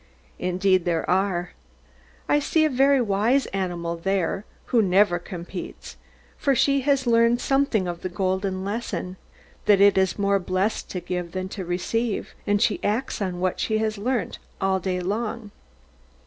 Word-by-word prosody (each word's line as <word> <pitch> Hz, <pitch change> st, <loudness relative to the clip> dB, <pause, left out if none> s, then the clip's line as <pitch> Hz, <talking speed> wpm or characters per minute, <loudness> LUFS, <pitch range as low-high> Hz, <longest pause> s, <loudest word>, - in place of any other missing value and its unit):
Indeed 185 Hz, 0 st, +2 dB
there 170 Hz, -2 st, 0 dB
are. 180 Hz, -1 st, 0 dB, 0.8 s
I 295 Hz, -, +3 dB
see 315 Hz, +2 st, +2 dB
a 310 Hz, -, +1 dB
very 270 Hz, +2 st, +4 dB
wise 230 Hz, +4 st, +2 dB
animal 175 Hz, -3 st, -2 dB
there, 195 Hz, +2 st, -1 dB, 0.3 s
who 235 Hz, -, +6 dB
never 190 Hz, -2 st, +3 dB
competes; 175 Hz, 0 st, -8 dB, 0.4 s
for 275 Hz, -2 st, +2 dB
she 275 Hz, +2 st, +3 dB
has 275 Hz, -1 st, +1 dB
learned 230 Hz, 0 st, +4 dB
something 270 Hz, -9 st, +1 dB
of 175 Hz, -1 st, -5 dB
the 185 Hz, -, -3 dB
golden 190 Hz, +1 st, -1 dB
lesson 195 Hz, -4 st, -4 dB, 0.5 s
that 205 Hz, -2 st, +6 dB
it 200 Hz, -1 st, +6 dB
is 190 Hz, -1 st, +1 dB
more 200 Hz, -1 st, +2 dB
blessed 185 Hz, +3 st, -1 dB
to 180 Hz, -, -4 dB
give 180 Hz, -2 st, -4 dB
than 185 Hz, 0 st, -3 dB
to 190 Hz, -2 st, -6 dB
receive; 205 Hz, +6 st, -2 dB
and 205 Hz, 0 st, +3 dB
she 210 Hz, -1 st, +1 dB
acts 220 Hz, +3 st, -1 dB
on 185 Hz, -3 st, -2 dB
what 185 Hz, 0 st, -1 dB
she 220 Hz, -, 0 dB
has 215 Hz, -1 st, -1 dB
learnt, 245 Hz, +2 st, -2 dB, 0.2 s
all 190 Hz, 0 st, +1 dB
day 185 Hz, 0 st, -2 dB
long. 215 Hz, +3 st, -3 dB
195 Hz, 160 wpm, -24 LUFS, 185-230 Hz, 0.8 s, who